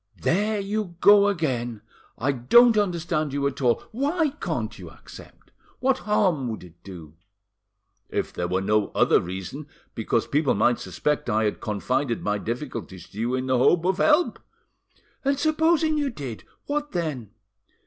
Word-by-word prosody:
"There 205 - +1
you 200 -2 -3
go 205 +1 +7
again! 125 - -2 0.3
I 130 +5 +1
don't 225 - +5
understand 170 -7 0
you 140 0 -1
at 140 0 -2
all! 120 -2 +2
Why 295 +7 0
can't 290 - -4
you - - -9
accept? - - -15 0.3
What 265 0 +1
harm 180 -11 +2
would 110 - -6
it 90 -3 -14
do?" 85 -6 -11 1.0
"If - - -3
there 90 - -2
were 95 +1 0
no 105 +1 +1
other - - +4
reason, 95 - -7 0.3
because 115 0 0
people 140 +4 +1
might 120 0 +2
suspect 150 0 -2
that 115 - 0
I 110 -1 +2
confided 115 +4 -2
my 105 0 0
difficulties 115 - -6
to 105 - -10
you 120 +3 0
in 130 0 -2
the 130 -1 +1
hope 170 +6 +3
of 185 0 +1
help." 310 - +3 0.8
"And 275 0 +1
supposing 315 +1 +2
you 285 -1 0
did, 135 - -7 0.2
what 295 0 -3
then? 150 - -3
145 Hz, 160 wpm, -25 LUFS, -, 1.0 s, go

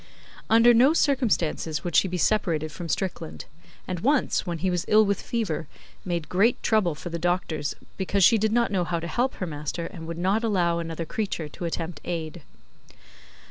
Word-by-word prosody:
Under 230 +2 +6
no 255 +6 +5
circumstances 220 - +1
would 175 -3 -3
she - - +5
be 180 0 -3
separated 170 -6 +1
from 170 +2 -7
Strickland; 170 -4 -3 0.4
and 180 -2 -3
once, 270 - +1
when 170 -1 -2
he 185 +3 0
was 180 -1 0
ill 215 0 +5
with 200 -1 0
fever, 185 -10 -2 0.4
made 170 -4 -3
great 205 +6 +2
trouble 200 -8 +2
for 175 - -7
the 170 0 -4
doctors, 170 -4 -1 0.2
because 195 0 +1
she 220 +6 +6
did 215 +1 +1
not 235 -1 +2
know 185 -3 +1
how 170 -1 -2
to 165 - -6
help 245 +9 0
her 185 - -3
master 150 +1 -4
and 165 -1 -8
would 165 0 -5
not 195 +6 +1
allow 175 -6 +1
another 165 0 -4
creature 200 -7 -3
to 170 - -7
attempt 165 -1 -4
aid. 165 -1 -4
180 Hz, 185 wpm, -25 LUFS, 165-215 Hz, 0.4 s, Under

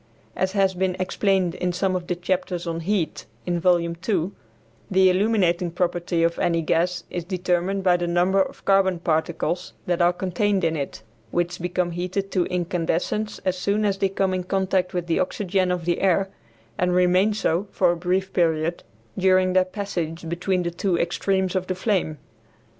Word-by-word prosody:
As 190 0 -1
has 195 -2 +2
been 185 0 0
explained 185 -1 +1
in 180 0 -1
some 185 +1 0
of 175 -1 -3
the 180 - -1
chapters 180 0 -2
on 165 -1 -3
heat, 175 -1 -2 0.2
in 175 -1 0
Volume 170 -1 +2
II, 185 -2 +1 0.6
the 190 -1 +5
illuminating 185 -3 +2
property 175 -1 0
of 170 0 +1
any 165 -1 +1
gas 175 +2 0
is 175 - -3
determined 185 +1 -1
by 180 -2 +4
the 175 0 -2
number 180 +3 +3
of - - -4
carbon 195 -2 +3
particles 170 +1 -1
that 175 -1 0
are 175 0 +5
contained 190 +2 0
in 165 -1 +1
it, 140 -6 -5 0.3
which 175 +4 -1
become 180 0 -1
heated 185 +3 -3
to 180 -3 +1
incandescence 180 +4 -1
as 185 -1 0
soon 205 +3 +1
as 195 -1 0
they 195 - +2
come 190 0 0
in 185 -1 -1
contact 190 0 0
with 175 -1 -1
the 170 - 0
oxygen 185 -1 0
of 175 -2 -2
the 175 0 0
air, 195 0 +2 0.5
and 180 0 +2
remain 180 +3 +4
so, 205 -2 0
for - - +2
a - - -1
brief 185 +2 -1
period, 165 -1 +1 0.3
during 185 0 +3
their 185 0 +4
passage 175 -4 -4
between 175 +2 -1
the 170 - -2
two 175 +1 0
extremes 190 +2 0
of 185 0 -1
the 185 - -1
flame. 185 -5 0
180 Hz, 180 wpm, -24 LUFS, 175-190 Hz, 0.6 s, the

